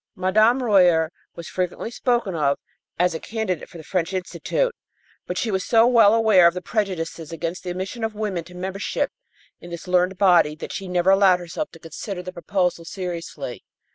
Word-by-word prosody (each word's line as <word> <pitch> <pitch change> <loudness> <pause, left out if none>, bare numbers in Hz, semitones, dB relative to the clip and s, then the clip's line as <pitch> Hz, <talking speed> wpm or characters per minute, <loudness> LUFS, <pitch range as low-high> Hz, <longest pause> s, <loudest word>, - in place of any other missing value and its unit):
Mme. 215 +6 +3
Royer 175 -7 +4 0.2
was 170 - -8
frequently 185 +5 -3
spoken 240 -5 0
of 145 -4 +1 0.4
as 180 0 +2
a 160 - -4
candidate 220 -7 -3
for - - -11
the 160 - -10
French 180 +2 -2
Institute, - - -1 0.5
but 180 - -3
she 225 - -1
was 190 -1 0
so 225 -1 +4
well 225 -3 +6
aware 215 -6 +6
of 170 - +1
the 180 - -3
prejudices 170 -7 -3
against 165 +3 -4
the 180 - -5
admission 190 +6 -4
of 220 -1 -2
women 205 -5 -2
to 180 +1 -13
membership 190 +2 -2 0.5
in 175 - -11
this 170 +1 -8
learned 180 +1 +2
body 175 -6 +4
that - - -7
she 195 - -5
never 180 +1 +2
allowed 195 -2 +5
herself 175 - -5
to 165 - -13
consider 180 +4 -6
the 185 0 -7
proposal 180 -1 -1
seriously. 175 -1 -6
185 Hz, 185 wpm, -23 LUFS, 170-205 Hz, 0.5 s, well